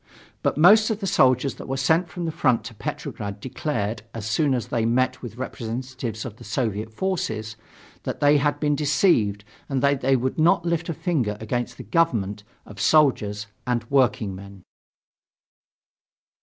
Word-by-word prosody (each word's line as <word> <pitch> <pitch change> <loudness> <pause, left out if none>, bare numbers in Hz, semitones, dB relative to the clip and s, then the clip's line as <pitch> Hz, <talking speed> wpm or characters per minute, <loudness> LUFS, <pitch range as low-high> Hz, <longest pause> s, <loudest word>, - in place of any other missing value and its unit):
But - - 0
most 210 +7 +7
of 215 -2 -1
the 200 - -3
soldiers 130 -6 +3
that - - -9
were 135 0 -2
sent 160 +6 +2
from 175 -1 -5
the 165 - -1
front 130 -7 +1
to 120 - -8
Petrograd 105 -1 -5
declared, 115 -4 -3
as 110 -3 -5
soon 135 +5 +1
as 120 - -3
they 115 -2 0
met 130 +3 +1
with 120 -2 -8
representatives 125 -1 -5
of 110 -3 -7
the - - -12
Soviet 110 -2 -2
forces, 110 - -2 0.5
that - - -5
they 145 +1 +5
had 145 0 0
been 150 -1 +1
deceived 135 - +2 0.3
and 135 -1 -1
that 140 -1 +2
they 135 +1 +3
would 130 +4 -1
not 170 +1 +4
lift 170 0 -1
a 165 - -2
finger 125 - -1
against 120 +2 -3
the - - -8
government 110 - 0 0.2
of 100 -3 -9
soldiers 105 -8 +3 0.2
and 120 -2 0
workingmen. 100 -8 0
130 Hz, 165 wpm, -24 LUFS, 110-150 Hz, 0.5 s, most